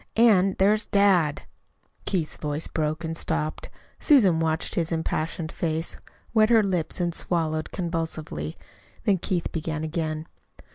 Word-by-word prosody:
And 195 -5 +5
there's 210 +2 +3
dad." 185 -7 +3 0.6
Keith's 170 -6 -1
voice 150 +1 -3
broke 155 +1 -2
and 165 0 -3
stopped. 155 -1 -3 0.3
Susan, 205 - +5
watching 160 +1 0
his 165 - -4
impassioned 160 0 -2
face, 165 0 -2 0.3
wet 215 -1 +5
her 225 -2 +5
lips 180 -4 -1
and 175 -1 0
swallowed 160 -2 -1
convulsively. 160 - -3 0.5
Then 195 -3 +2
Keith 175 -1 -1
began 160 -1 -3
again. 155 -1 -2
165 Hz, 130 wpm, -25 LUFS, 155-190 Hz, 0.6 s, And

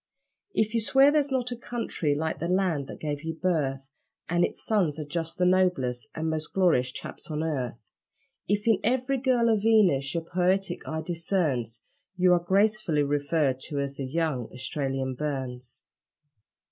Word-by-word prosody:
If 215 0 +1
you 230 - +2
swear 270 +5 +5
there's 295 -2 +2
not 250 -2 -1
a - - -2
country 230 -11 -2
like 160 +2 -2
the 170 - -2
land 180 -6 +1
that - - -9
gave 145 -2 -3
you 160 0 -3
birth, 135 -7 -1 0.4
And 175 +1 +2
its - - -2
sons 180 -9 +2
are 155 - -3
just 165 +2 -4
the 180 - +2
noblest 180 -10 +2
and 160 +1 -2
most 155 -1 -3
glorious 160 -10 +3
chaps - - -8
on 155 0 -2
earth; 125 -8 -4 0.6
If 205 +3 0
in 220 -4 +4
every 255 +3 +1
girl 245 -2 +2
a 225 - +4
Venus 200 -10 +3
your 165 - -1
poetic 180 +1 0
eye 160 0 -3
discerns, 155 - 0 0.3
You 180 0 +5
are 175 - +4
gracefully 195 -3 +2
referred 145 -1 0
to 145 -3 -3
as 140 0 -3
the 135 - -3
'young 135 -4 -1
Australian 135 0 -2
Burns'. 130 -3 -5
165 Hz, 170 wpm, -27 LUFS, 140-195 Hz, 0.6 s, swear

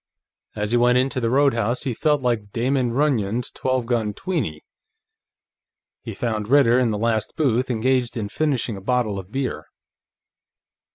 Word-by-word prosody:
As 105 0 -2
he 120 - +3
went 120 +1 +4
into 130 +1 +1
the 115 -2 0
roadhouse, 125 -3 +2
he 130 -4 -2
felt 150 +2 +1
like 110 -5 -1
Damon 125 +1 0
Runyon's 120 -4 0
Twelve 130 -2 -1
Gun 115 -4 -1
Tweeney. 120 - -3 1.4
He - - -7
found 110 -3 -2
Ritter 125 -2 +5
in 125 -2 +2
the 105 - -1
last 110 0 -1
booth, 130 -4 +1
engaged 125 +1 0
in 105 -3 -2
finishing 130 -3 -1
a 95 - -9
bottle 110 -2 0
of 95 +1 -11
beer. 125 - -3
120 Hz, 155 wpm, -22 LUFS, 110-130 Hz, 1.4 s, Ritter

